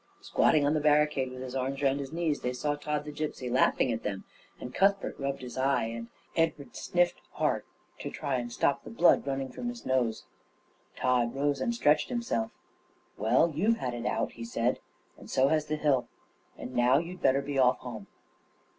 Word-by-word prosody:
Squatting 150 Hz, -2 st, +3 dB
on 145 Hz, -, +3 dB
the 155 Hz, -, +2 dB
barricade, 150 Hz, -3 st, +3 dB
with 130 Hz, 0 st, -7 dB
his 130 Hz, 0 st, -6 dB
arms 135 Hz, +2 st, -2 dB
round 135 Hz, 0 st, +2 dB
his 135 Hz, -1 st, -5 dB
knees, 165 Hz, -3 st, -1 dB
they 125 Hz, -, -1 dB
saw 145 Hz, +4 st, -1 dB
Tod 150 Hz, 0 st, -3 dB
the 150 Hz, -, -6 dB
Gipsy 145 Hz, -4 st, -4 dB
laughing 130 Hz, 0 st, +3 dB
at 115 Hz, -, -2 dB
them; 95 Hz, -2 st, -4 dB, 0.4 s
and 125 Hz, -, -7 dB
Cuthbert 195 Hz, +4 st, +2 dB
rubbed 140 Hz, -1 st, -3 dB
his 125 Hz, +1 st, -6 dB
eye, 135 Hz, -1 st, +2 dB
and 115 Hz, +1 st, -5 dB, 0.3 s
Edward 165 Hz, -4 st, 0 dB
sniffed 175 Hz, 0 st, +1 dB
hard -, -, 0 dB, 0.3 s
to -, -, -4 dB
try 135 Hz, -2 st, -2 dB
and 120 Hz, -1 st, -4 dB
stop 140 Hz, -, +1 dB
the -, -, -9 dB
blood 180 Hz, -9 st, +4 dB
running 135 Hz, -1 st, -2 dB
from 240 Hz, -, -4 dB
his 240 Hz, 0 st, -8 dB
nose. 125 Hz, -4 st, 0 dB, 0.7 s
Tod 125 Hz, -2 st, +1 dB
rose 140 Hz, 0 st, 0 dB
and 235 Hz, -, 0 dB
stretched 150 Hz, -9 st, +3 dB
himself. 235 Hz, -, -1 dB, 0.7 s
"Well, 110 Hz, +10 st, +3 dB
you've 215 Hz, +8 st, +2 dB
had 125 Hz, -, -3 dB
it 120 Hz, 0 st, -3 dB
out," -, -, -1 dB
he 115 Hz, -, -9 dB
said, 115 Hz, +2 st, 0 dB, 0.4 s
"and -, -, -13 dB
so 135 Hz, +1 st, +3 dB
has 155 Hz, -1 st, +1 dB
the 155 Hz, -, -1 dB
hill, 145 Hz, -5 st, +1 dB, 0.5 s
and 130 Hz, -, -7 dB
now 125 Hz, +2 st, +4 dB
you'd 170 Hz, +4 st, -4 dB
better 135 Hz, +1 st, +3 dB
be 140 Hz, -1 st, -2 dB
off 125 Hz, -1 st, +5 dB
home." 110 Hz, -5 st, -8 dB
135 Hz, 195 wpm, -29 LUFS, 125-150 Hz, 0.7 s, off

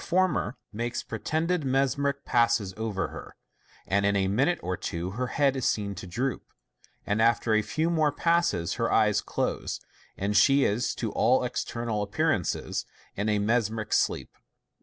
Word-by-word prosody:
former 175 Hz, -, +1 dB, 0.2 s
makes 120 Hz, +3 st, -3 dB
pretended 165 Hz, +1 st, -1 dB
mesmeric 140 Hz, +1 st, 0 dB
passes 115 Hz, -5 st, +2 dB
over 110 Hz, -3 st, -2 dB
her, -, -, -10 dB, 0.5 s
and 100 Hz, +1 st, +1 dB
in 100 Hz, 0 st, +2 dB
a 95 Hz, -1 st, +2 dB
minute 135 Hz, -, +2 dB
or 90 Hz, 0 st, -1 dB
two 85 Hz, +1 st, -4 dB
her 125 Hz, +5 st, -2 dB
head 140 Hz, +1 st, +2 dB
is 130 Hz, -, -3 dB
seen 100 Hz, -3 st, 0 dB
to 95 Hz, 0 st, -8 dB
droop, 125 Hz, +9 st, -2 dB, 0.6 s
and 105 Hz, +2 st, 0 dB
after 115 Hz, 0 st, +3 dB
a 110 Hz, -, +4 dB
few 155 Hz, +9 st, -1 dB
more 160 Hz, -3 st, +2 dB
passes 170 Hz, -, +1 dB
her -, -, +1 dB
eyes -, -, +3 dB
close, -, -, -2 dB, 0.4 s
and 100 Hz, +2 st, -1 dB
she 135 Hz, +7 st, +5 dB
is, 110 Hz, +5 st, 0 dB
to 115 Hz, -3 st, -3 dB
all 125 Hz, +4 st, +3 dB
external 115 Hz, -3 st, -2 dB
appearance, 105 Hz, -, 0 dB, 0.6 s
in 105 Hz, +2 st, -1 dB
a 105 Hz, -, +2 dB
mesmeric 110 Hz, 0 st, 0 dB
sleep. -, -, +1 dB
115 Hz, 160 wpm, -27 LUFS, 100-140 Hz, 0.6 s, she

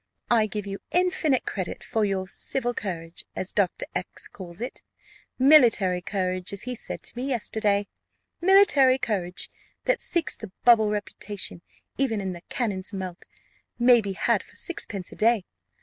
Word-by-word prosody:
I 225 Hz, -2 st, +4 dB
give 210 Hz, -1 st, -4 dB
you 195 Hz, 0 st, -5 dB
infinite 355 Hz, -7 st, +2 dB
credit 185 Hz, -3 st, -4 dB
for 220 Hz, -, 0 dB
your 190 Hz, -2 st, -1 dB
civil 245 Hz, +5 st, -2 dB
courage, 170 Hz, -6 st, -5 dB
as 185 Hz, -, -2 dB
Dr. 195 Hz, -4 st, 0 dB
X -, -, -5 dB
calls 175 Hz, -1 st, -9 dB
it: 245 Hz, +3 st, -5 dB, 0.6 s
military 235 Hz, -10 st, +5 dB
courage, 185 Hz, -1 st, -2 dB
as 200 Hz, -, -4 dB
he 250 Hz, -, -3 dB
said 245 Hz, -, -5 dB
to -, -, -1 dB
me 250 Hz, +3 st, -3 dB
yesterday 210 Hz, -5 st, 0 dB, 0.5 s
military 345 Hz, -9 st, +6 dB
courage, 185 Hz, -7 st, -2 dB, 0.4 s
that -, -, +2 dB
seeks 340 Hz, -2 st, 0 dB
the 215 Hz, -4 st, -9 dB
bubble 225 Hz, -3 st, +6 dB
reputation 205 Hz, -3 st, -4 dB, 0.4 s
even 240 Hz, -6 st, +1 dB
in 190 Hz, -2 st, -3 dB
the 175 Hz, -, -9 dB
cannon's 205 Hz, -6 st, -1 dB
mouth, 185 Hz, -3 st, -5 dB, 0.6 s
may 240 Hz, -1 st, +6 dB
be 200 Hz, -2 st, -4 dB
had -, -, +1 dB
for -, -, -18 dB
sixpence 210 Hz, -, -4 dB
a -, -, -10 dB
day. 225 Hz, -3 st, +3 dB
210 Hz, 155 wpm, -26 LUFS, 190-250 Hz, 0.6 s, military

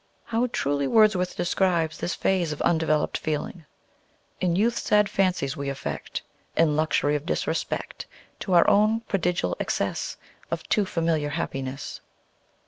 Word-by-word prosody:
How 235 Hz, +2 st, 0 dB
truly 140 Hz, -, 0 dB
Wordsworth 210 Hz, -2 st, +3 dB
describes 170 Hz, -3 st, +1 dB
this 175 Hz, -, -2 dB
phase 180 Hz, -4 st, +1 dB
of 150 Hz, -, -5 dB
undeveloped 160 Hz, -2 st, +1 dB
feeling: 155 Hz, +2 st, -3 dB, 0.7 s
"In 175 Hz, -2 st, +1 dB
youth 225 Hz, +5 st, +2 dB
sad 210 Hz, -1 st, +3 dB
fancies 180 Hz, -9 st, 0 dB
we 140 Hz, 0 st, -3 dB
affect, 140 Hz, -, -5 dB, 0.3 s
In 160 Hz, -3 st, +4 dB
luxury 150 Hz, -1 st, +2 dB
of 145 Hz, -, -2 dB
disrespect -, -, -2 dB, 0.3 s
To 190 Hz, -, -2 dB
our 170 Hz, -, +6 dB
own 215 Hz, +2 st, +4 dB
prodigal 180 Hz, -, -1 dB
excess -, -, -2 dB, 0.3 s
Of -, -, -3 dB
too 210 Hz, -3 st, +3 dB
familiar 165 Hz, -4 st, 0 dB
happiness." 135 Hz, -3 st, -4 dB
170 Hz, 135 wpm, -25 LUFS, 150-195 Hz, 0.7 s, our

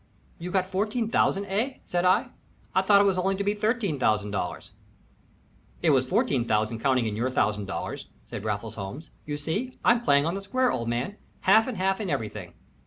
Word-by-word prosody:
"You 175 Hz, +2 st, -5 dB
got 185 Hz, 0 st, +1 dB
fourteen 210 Hz, +4 st, -1 dB
thousand, 200 Hz, +1 st, +2 dB
eh?" 220 Hz, +8 st, -1 dB
said 175 Hz, 0 st, -1 dB
I. 185 Hz, -, +3 dB, 0.4 s
"I 190 Hz, -, +4 dB
thought 200 Hz, +1 st, +6 dB
it -, -, +5 dB
was 195 Hz, -2 st, +2 dB
only 195 Hz, +2 st, +1 dB
to 200 Hz, -, -2 dB
be 205 Hz, +1 st, +1 dB
$13,000." 145 Hz, -, -1 dB, 1.1 s
"It -, -, +5 dB
was 130 Hz, -2 st, +3 dB
fourteen 210 Hz, -, +2 dB
thousand 110 Hz, 0 st, 0 dB
counting 130 Hz, -2 st, +2 dB
in 105 Hz, -2 st, -2 dB
your 120 Hz, +4 st, 0 dB
$1000," 105 Hz, -5 st, -2 dB, 0.2 s
said -, -, -7 dB
Raffles 105 Hz, 0 st, -3 dB
Holmes. 110 Hz, -, -7 dB, 0.2 s
"You 145 Hz, -1 st, -2 dB
see, 205 Hz, -, -3 dB
I'm 235 Hz, 0 st, +5 dB
playing 140 Hz, -10 st, +3 dB
on 165 Hz, -, 0 dB
the 195 Hz, -, -4 dB
square, 250 Hz, +6 st, +1 dB
old 115 Hz, -1 st, -2 dB
man. 125 Hz, -, -2 dB, 0.2 s
Half 220 Hz, +5 st, +5 dB
and 250 Hz, -5 st, -4 dB
half 190 Hz, +3 st, 0 dB
in 200 Hz, -, -3 dB
everything." 105 Hz, -, -4 dB
180 Hz, 185 wpm, -26 LUFS, -, 1.1 s, thought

